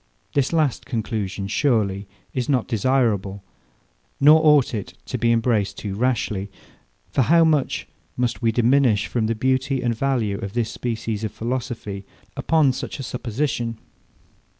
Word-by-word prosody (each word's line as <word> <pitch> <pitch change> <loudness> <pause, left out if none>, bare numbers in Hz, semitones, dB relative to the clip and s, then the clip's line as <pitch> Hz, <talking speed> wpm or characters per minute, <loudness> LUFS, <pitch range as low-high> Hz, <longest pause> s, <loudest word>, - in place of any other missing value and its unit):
This 140 -2 +1
last 155 -5 0
conclusion, 105 -5 -3
surely, 100 -5 +1 0.3
is 125 0 -2
not 130 -5 +1
desirable; 110 -5 0 0.8
nor 155 +3 +7
ought 150 -5 +5
it 95 -5 -5
to 125 - -4
be 115 0 +3
embraced 115 -3 +1
too 100 -2 -4
rashly. 105 -3 -1 0.6
For - - +2
how 165 +7 +5
much 155 -4 +1 0.3
must 125 -1 -1
we 115 -1 +2
diminish 120 -2 +3
from 115 -3 -1
the 115 - 0
beauty 130 +3 0
and 120 -1 +1
value 115 -6 0
of 100 -2 -6
this 120 -2 -1
species 115 -2 -3
of 110 - -2
philosophy, 115 -5 -4 0.3
upon 155 -5 +3
such 130 - -6
a - - -4
supposition? 120 0 -2
120 Hz, 145 wpm, -22 LUFS, 105-130 Hz, 0.8 s, nor